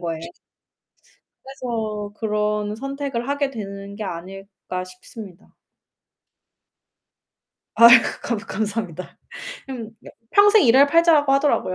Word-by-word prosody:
거예요. 165 -2 -4 1.2
그래서 220 -6 -5
'그런 210 -1 -2
선택을 275 -1 -5
하게 285 -1 -1
되는 200 -4 -8
게 215 - -5
아닐까.' 190 +1 -7
싶습니다. 185 +1 -13 2.2
아이고 235 +1 +8 0.2
감 235 -2 -2
감사합니다. 205 -4 -5 0.5
음 235 -4 -7 0.4
평생 410 -1 +5
일할 265 +4 +6
팔자라고 310 -2 +4
하더라고요. 275 -9 +1
220 Hz, 235 characters per minute, -21 LUFS, 200-270 Hz, 2.2 s, 아이고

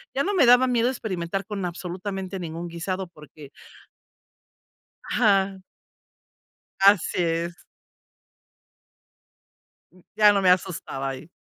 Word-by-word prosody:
ya 275 - +1
no 405 - -1
me 340 -9 +4
daba 245 +1 +6
miedo 240 -1 +1
experimentar 195 -6 -4
con 205 -3 -4
absolutamente 185 +2 -5
ningún 170 0 -6
guisado 185 +3 -4
porque 150 -3 -15 1.5
Ajá. 195 -4 +1 1.2
Así 195 -2 +4
es. 170 0 -2 2.5
Ya 210 -1 +7
no 200 - +1
me 185 - +4
asustaba 175 -7 -1
ahí. 135 +4 -8
190 Hz, 100 wpm, -24 LUFS, 170-205 Hz, 2.5 s, Ya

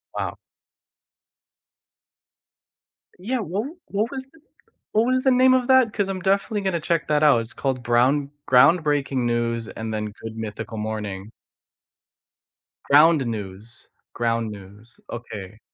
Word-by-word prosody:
Wow. - - -3 2.8
Yeah. 245 +7 -2
What 200 +3 -3 0.2
what 210 +4 -1
was 265 -1 -4 0.6
what 220 +2 +3
was 255 +1 +1
the 265 - +4
name 255 +1 +5
of 255 -1 +2
that? 260 -4 +4
'Cause 200 -2 -1
I'm 185 -1 -4
definitely 200 +3 0
gonna 190 -3 -1
check 165 0 -1
that 150 0 +2
out, 145 -6 +5
it's 115 -1 -1
called 130 -3 -2
brown 130 +4 +2 0.2
Groundbreaking 140 -2 +3
News 115 -1 -1
and 110 0 -6
then 105 -1 -4
Good 115 0 -7
Mythical 110 +1 -6
Morning. 105 -1 -5 1.5
Ground 150 0 +5
News 105 0 -7 0.3
Ground 115 -1 -1
News, 105 +3 -13
okay. 110 -3 -8
130 Hz, 125 wpm, -23 LUFS, -, 2.8 s, name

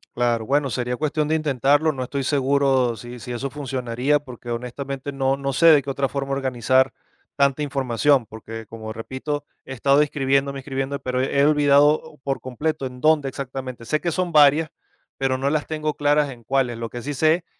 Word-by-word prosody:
Claro, 120 -2 +1
bueno, 140 0 +1
sería 125 0 -2
cuestión 155 +1 -1
de 160 - +1
intentarlo, 145 +1 +2
no 130 -3 -4
estoy 135 +2 -3
seguro 135 -3 +2
sí 120 +3 -9
sí 125 - -8
eso 120 +3 -3
funcionaría, 130 -1 -1
porque 125 -4 -11
honestamente 135 +4 -5
no 135 0 0
no 135 0 -3
sé 165 +7 +4
de 155 -3 +8
qué 140 - -6
otra 135 0 -1
forma 140 -1 -3
organizar 130 0 +2 0.4
tanta 140 0 +2
información, 135 -1 +1
porque, 110 +1 -9
como 110 0 -8
repito, 130 +6 -5 0.2
he - - -11
estado 140 +3 +3
inscribiéndome 140 -1 0
inscribiendo, 135 +1 -3
pero 125 -1 -2
he 140 +1 +2
olvidado 150 0 +3
por 135 -1 -2
completo 135 +3 -3
en 125 0 -11
dónde 155 -1 +3
exactamente. 130 -2 -6
Sé 155 +6 0
que 170 - -1
son 180 +1 -1
varias, 150 +1 +5 0.5
pero 135 -1 0
no 135 +2 0
las 150 0 -1
tengo 155 -1 -2
claras 145 0 +2
en 120 -2 -13
cuáles. 125 -1 0
Lo 115 0 -5
que 120 - -7
sí 145 +4 -4
sé 160 +5 +2
135 Hz, 190 wpm, -22 LUFS, 125-145 Hz, 0.5 s, de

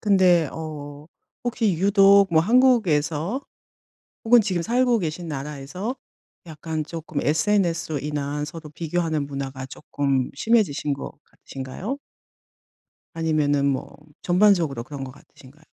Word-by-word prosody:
근데 185 -6 +4
어 150 -2 -7 0.4
혹시 225 -5 +1
유독 200 0 +5
뭐 160 - +6
한국에서 210 - +2 0.8
혹은 240 +1 +7
지금 190 -5 -1
살고 245 +4 +2
계신 165 0 -4
나라에서 150 - -5 0.5
약간 160 -1 -4
쪼끔 160 -2 -5
SNS로 165 -1 +1
인한 145 0 -3
서로 155 0 -9
비교하는 160 -1 -2
문화가 135 -2 -5
쪼끔 135 -1 -2
심해지신 160 -6 +1
것 140 - -7
같으신가요? 140 - -7 1.2
아니면은 155 -4 +1
뭐 140 +1 -3 0.2
전반적으로 175 - +3
그런 140 +1 -7
것 130 - -7
같으신가요? 140 +2 -19
160 Hz, 280 characters per minute, -23 LUFS, 145-195 Hz, 1.2 s, 혹은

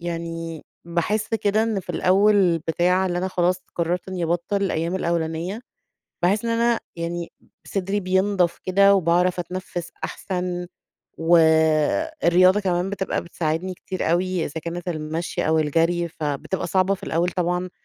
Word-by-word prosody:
يعني 165 -1 -5 0.2
باحس 175 +6 -1
كده 215 0 +2
إن 220 -3 0
في - - -7
الأول 190 -2 +3
بتاع 175 +4 +1
اللي 175 -1 -1
أنا 185 +1 -1
خلاص 180 0 +1 0.2
قررت 175 +2 -1
إني 185 -2 -2
ابطل 175 +4 -1
الأيام 170 -2 -1
الأولانية، 170 +3 -2 0.6
باحس 200 +5 +2
إن 230 - 0
أنا 230 0 +2 0.2
يعني 170 0 -4 0.3
صدري 195 +1 -1
بينضف 190 -1 +1
كده، 200 +2 +5
وباعرف 180 0 +2
أتنفس 175 0 -5
احسن، 180 -1 -3 0.5
و 165 +1 +4 0.9
الرياضة 185 +3 +5
كمان 185 -1 0
بتبقى 195 -1 -2
بتساعدني 170 +2 -2
كتير 185 -2 -3
أوي، 180 0 +1
إذا 160 +3 -5
كانت 175 +1 -5
المشي 160 0 -3
أو 160 0 +3
الجري 165 +3 +1
فبتبقى 155 +4 -3
صعبة 190 +2 +2
في 190 - -13
الأول 170 +2 0
طبعًا 180 0 -1
180 Hz, 140 wpm, -23 LUFS, 170-190 Hz, 0.9 s, كده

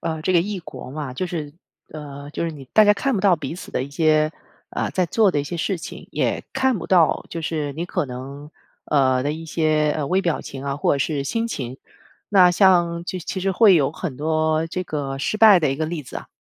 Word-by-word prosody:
呃， 160 -1 -3
这 185 - +1
个 175 - +5
异 200 +3 -3
国 160 -6 -10
嘛， 140 -2 -5
就 185 - -2
是 155 -5 -5 0.4
呃， 145 -2 -8
就 160 - -3
是 165 - -2
你 145 -4 -10
大 215 - +7
家 205 - +6
看 250 +7 -1
不 200 - 0
到 190 -3 +4
彼 150 0 -5
此 180 - -9
的 - - -1
一 140 - -7
些， 155 0 +2 0.4
呃， - - -2
在 185 -2 0
做 210 +3 +3
的 145 - 0
一 - - -5
些 170 +4 -5
事 180 +2 -1
情。 - - -9
也 - - -1
看 265 -4 +1
不 165 - -6
到 175 -4 +3
就 170 - -4
是 155 -3 -2
你 165 - -3
可 150 - -2
能 135 +4 -8 0.4
呃 130 -3 +2
的 145 +2 -1
一 165 +1 -7
些 155 -1 +1
微 185 +7 +1
表 170 -4 -1
情 135 0 -8
啊， 140 0 -2
或 145 - +1
者 140 - -2
是 145 0 -1
心 225 +11 -1
情。 130 - -5 0.5
那 185 -3 +6
像 175 -2 +3
其 185 - -4
其 185 +3 -4
实 190 +1 0
会 200 0 +6
有 140 -4 +3
很 160 -4 -5
多 155 +1 0
这 180 +2 -3
个 140 -5 -4
失 215 - -1
败 215 -3 +8
的 150 -4 +1
一 135 - -2
个 155 +1 -1
例 165 -2 -4
子 125 - -8
啊。 - - -8
160 Hz, 260 characters per minute, -22 LUFS, 145-185 Hz, 0.5 s, 败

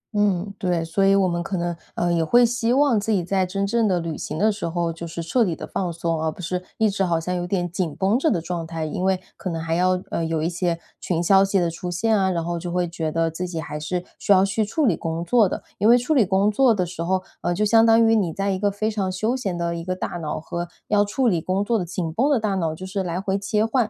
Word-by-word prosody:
嗯， 200 -1 +1
对， 175 -4 0
所 180 +4 0
以 195 0 +5
我 195 -2 +3
们 170 -1 -1
可 185 +2 -3
能， 175 0 -2 0.2
呃， 175 0 +1
也 165 -1 +2
会 240 +8 +5
希 235 0 0
望 270 -4 +4
自 220 +2 -2
己 190 -4 +2
在 190 +1 0
真 195 +2 -1
正 225 +1 +1
的 180 -2 +1
旅 165 -2 -4
行 - - -5
的 215 +4 +3
时 200 -5 -4
候 170 0 -1
就 170 +1 -7
是 165 0 -5
彻 235 +8 +2
底 175 -5 -1
地 - - -7
放 180 -2 -3
松， 165 -1 -2
而 160 -1 0
不 - - -16
是 180 +1 -3
一 220 - +3
直 195 -1 0
好 170 -3 +1
像 180 +3 -3
有 175 0 -2
点 180 -2 -1
紧 175 -4 -2
绷 200 +5 +1
着 315 +3 +2
的 180 - +1
状 170 0 -4
态。 165 -1 -4
因 165 +4 -3
为 190 -1 +2 0.2
可 185 - -4
能 165 -1 -3
还 165 0 -2
要 180 +1 +2
呃， 165 - -1
有 160 -1 -1
一 - - +1
些 170 -1 -1 0.2
群 170 -2 -1
消 195 +2 +5
息 195 0 +1
的 170 -1 0
出 180 +2 -6
现 220 +5 +1
啊， 190 -2 +2
然 170 -2 -1
后 170 0 -2
就 175 0 -5
会 180 0 0
觉 165 -2 -3
得 165 0 0
自 180 +3 -4
己 170 -2 -4
还 150 0 -5
是 175 +4 -3 0.2
需 - - -1
要 190 0 +6
去 200 +3 0
处 280 +8 0
理 185 -8 +3
工 165 +1 -3
作 215 0 +4
的。 - - -5 0.2
因 210 - +3
为 240 - +8
处 245 +6 0
理 260 - +5
工 195 +2 +2
作 240 0 +4
的 185 - 0
时 175 -1 -7
候， 185 +2 0 0.2
呃， 175 - 0
就 210 +3 +1
相 225 +1 +5
当 230 0 +5
于 225 - +4
你 185 -6 +1
在 195 +2 -1
一 190 - -2
个 205 0 +2
非 215 +2 -2
常 195 -3 -1
休 215 +7 -1
闲 195 -9 -3
的 170 0 -1
一 165 - -5
个 185 +1 -2
大 - - -4
脑 155 -3 -4
和 170 +2 -5 0.2
要 205 -1 +4
处 245 +5 0
理 175 -6 +2
工 185 +4 0
作 230 0 +1
的 180 - -2
紧 170 -2 -4
绷 260 - +2
的 280 -5 +3
大 210 -2 -1
脑 165 -4 -1
就 185 - -8
是 195 +1 -3
来 175 0 -2
回 195 0 -1
切 210 +2 0
换， 230 -2 +1
185 Hz, 315 characters per minute, -23 LUFS, 170-205 Hz, 0.2 s, 为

